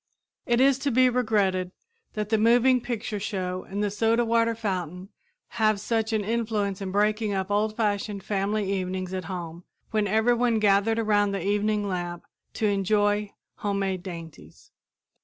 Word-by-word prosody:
It 240 0 +2
is 270 0 +4
to 280 - 0
be 255 0 +4
regretted 205 -7 +1 0.4
that 210 -1 -3
the 220 -1 +2
moving 245 +3 +4
picture 225 -3 -4
show 185 -3 -3
and 200 +2 -2
the 205 - 0
soda 225 +3 +2
water 230 0 +2
fountain 185 -4 -4 0.4
have 215 -2 +1
such 225 +1 -1
an 215 -2 0
influence 210 -3 -1
in 190 -1 -4
breaking 210 +1 +1
up 190 +1 -2
old 215 +1 0
fashioned 205 -2 -1
family 200 0 -1
evenings 185 -1 -3
at 185 -2 -3
home 175 -1 -6 0.3
when 215 -2 +1
everyone 230 +3 +2
gathered 210 +1 +3
around 205 -2 +2
the 195 - -3
evening 205 +1 +1
lamp 175 -2 -4 0.3
to 220 - -1
enjoy 205 +1 +1 0.3
homemade 195 -2 -1
dainties. 170 -4 -10
205 Hz, 155 wpm, -26 LUFS, 195-225 Hz, 0.4 s, is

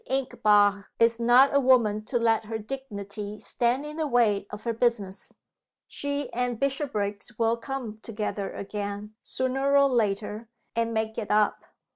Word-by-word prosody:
Inchbare 205 -6 +3
is 230 0 +3
not 245 +4 +5
a - - +6
woman 235 -6 +3
to 240 - -1
let 225 -1 +2
her 225 +1 -3
dignity 210 -4 -6
stand 245 +4 0
in 300 +1 -7
the 315 -2 0
way 220 -6 +2
of 210 - -8
her 235 - -1
business. 220 -5 -1 0.6
She 285 0 -2
and 245 -1 -1
Bishopriggs 240 -6 -2
will 230 0 +2
come 235 -3 -6
together 210 -3 -4
again, 205 +1 -5
sooner 270 +2 0
or 280 0 +6
later, 215 -2 -1 0.3
and 230 0 0
make 220 0 -2
it 215 - -5
up. 210 0 +2
230 Hz, 150 wpm, -27 LUFS, 210-255 Hz, 0.6 s, a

